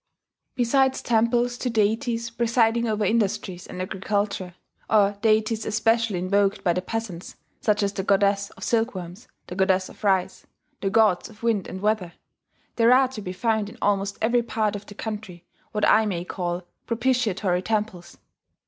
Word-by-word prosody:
] - - -65
Besides 265 +2 +2
temples 240 +1 +1
to 250 - -1
deities 230 +2 0
presiding 235 0 +2
over 215 -1 0
industries 195 -4 -1
and 180 - -8
agriculture, 190 -1 -2 0.3
or 205 -2 +4
deities 220 0 +2
especially 225 -1 +1
invoked 195 +2 +1
by 175 - +3
the 180 - -1
peasants, 190 -3 -5 0.2
such 210 -1 +1
as 200 0 0
the 195 - -2
goddess 200 +1 +2
of - - -9
silkworms, 220 -3 -2 0.2
the - - -8
goddess 190 0 +1
of - - -16
rice, 190 -3 0 0.3
the 195 - 0
gods 210 -3 +3
of 220 0 -17
wind 225 -5 +1
and 185 +1 -7
weather, 205 -5 0 0.6
there 230 0 +5
are 260 0 +5
to 230 -5 -7
be 185 - -5
found 215 +2 0
in - - -13
almost 200 -1 0
every 240 +2 +3
part 215 -3 -1
of 205 0 -8
the 205 - -11
country 210 -5 -6 0.3
what 210 -1 +1
I 220 0 +5
may 175 -3 -3
call 175 -1 -3 0.2
propitiatory 230 -7 +1
temples. 210 -4 -3
210 Hz, 165 wpm, -24 LUFS, 190-230 Hz, 0.6 s, there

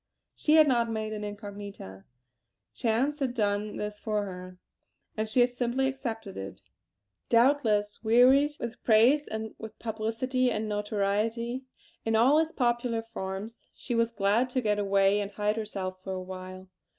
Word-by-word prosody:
She 305 - +2
had 310 -1 +7
not 235 -3 +2
made 215 -1 -3
an 210 -1 -5
incognita; 205 - -8 0.7
chance 255 +6 0
had 260 -3 -1
done 210 -1 -1
this 210 0 -5
for 210 -1 -1
her, 185 -1 -8 0.6
and 215 0 -2
she 245 +3 +3
had 245 0 +4
simply 245 +2 0
accepted 225 -6 -5
it. 95 0 -7 0.7
Doubtless, 230 -5 +2
wearied 255 +6 +5
with 235 0 -6
praise 245 +7 +4
and 220 0 -5
with 220 -1 -9
publicity 230 +3 -1
and 220 -2 -2
notoriety 215 +4 -1 0.4
in 225 0 0
all 260 +7 +5
its 320 0 0
popular 240 -3 0
forms, 205 0 -7
she 245 - -5
was 230 0 +2
glad 215 +4 +1
to 255 +1 0
get 210 -2 +1
away 200 0 +3
and 200 -1 -3
hide 210 0 0
herself 195 -4 -4
for 190 - -4
a 185 - -3
while. 185 0 -8
220 Hz, 155 wpm, -28 LUFS, 205-245 Hz, 0.7 s, had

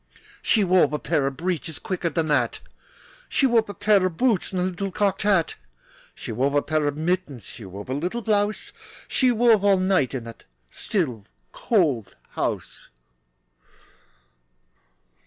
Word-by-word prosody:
She 215 - +3
wove 180 -5 +3
a - - +1
pair 150 -3 0
of 135 - -4
breeches 165 -3 -3
Quicker 180 -2 -2
than 160 +1 -1
that! 150 -2 +1 0.7
She 275 - +2
wove 230 -4 +3
a 205 - -6
pair 205 0 +3
of 180 -3 -1
boots 240 -8 +1
And 185 - -2
a - - +1
little 185 +1 -3
cocked 195 0 0
hat. 195 -5 +2 0.6
She - - -7
wove 135 +6 0
a 145 - +3
pair 155 -2 0
of 145 0 -2
mittens, 160 -6 -2
She 110 - -11
wove 95 +2 -9
a 130 - -3
little 180 - -3
blouse, 210 -1 0 0.3
She 255 -2 +2
wove 230 -3 +4
all 200 -1 +5
night 185 -8 +1
In 125 - -4
the 115 0 -9 0.4
still, 135 - -2 0.3
cold 145 - 0 0.2
house. - - -4
180 Hz, 155 wpm, -24 LUFS, 145-205 Hz, 0.7 s, all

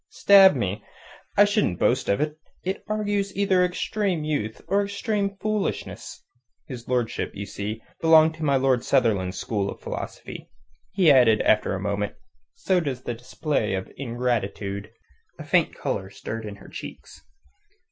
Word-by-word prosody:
Stab 195 -4 +7
me! 105 -3 -2 0.5
I 205 - +8
shouldn't 205 - +1
boast - - +1
of 100 - +2
it. 150 +1 -2 0.2
It 190 +2 -3
argues 205 -2 -1
either 190 -2 +3
extreme 180 -1 -1
youth 145 -8 -2
or 200 +1 +2
extreme 200 0 -2
foolishness." 215 -2 -3 0.4
His 120 -3 -9
lordship, 125 -2 -1
you 100 +1 -5
see, 105 +2 -5 0.2
belonged 160 -1 +6
to 160 - -6
my 140 -2 +3
Lord 130 -2 +2
Sunderland's 105 -8 +1
school 100 -3 -2
of - - -8
philosophy. - - -7 0.4
He 175 -5 +5
added 120 -5 +5
after 105 -2 +2
a - - -4
moment: 100 +1 -2 0.4
"So 185 -2 +1
does 135 -6 -4
the 120 - -3
display 125 -2 -2
of 95 - -5
ingratitude." 110 -5 -3 0.5
A - - -8
faint - - +2
colour - - -3
stirred 110 -1 -6
in 105 - -7
her - - -15
cheeks. - - -10
130 Hz, 150 wpm, -25 LUFS, -, 0.5 s, I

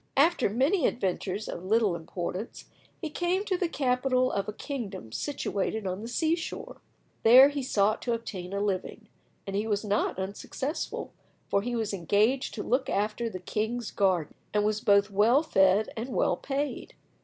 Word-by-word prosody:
After 320 -3 +4
many 270 - +2
adventures 195 -1 -2
of 170 - -6
little 210 -1 +2
importance 175 +5 -5 0.3
he 315 -4 -5
came 360 +5 0
to 385 - 0
the 360 -1 0
capital 255 -2 +1
of 200 -1 -2
a - - -5
kingdom 205 - -6
situated 215 - -2
on 185 +1 -3
the 225 - -6
sea 320 +7 +1
shore. 335 - -7 0.4
There 255 +5 +9
he 285 -1 -3
sought 215 -4 +1
to 240 - -1
obtain 195 -6 -5
a 200 - -2
living, 195 -3 -3 0.4
and 195 - -4
he 210 +2 0
was 210 0 -1
not 205 -2 0
unsuccessful, 200 - -4 0.4
for 200 - +2
he 240 +3 -3
was 220 -3 -1
engaged 205 - +1
to 210 - -4
look 255 +2 0
after 215 +3 -1
the 185 - -6
king's 220 +5 -3
garden, 185 -6 +1 0.2
and 210 0 +3
was 215 0 0
both 200 -1 +4
well 225 +9 +4
fed 195 - +3
and 230 +4 -4
well 190 -5 +1
paid. 280 +6 -4
220 Hz, 170 wpm, -28 LUFS, 195-260 Hz, 0.4 s, There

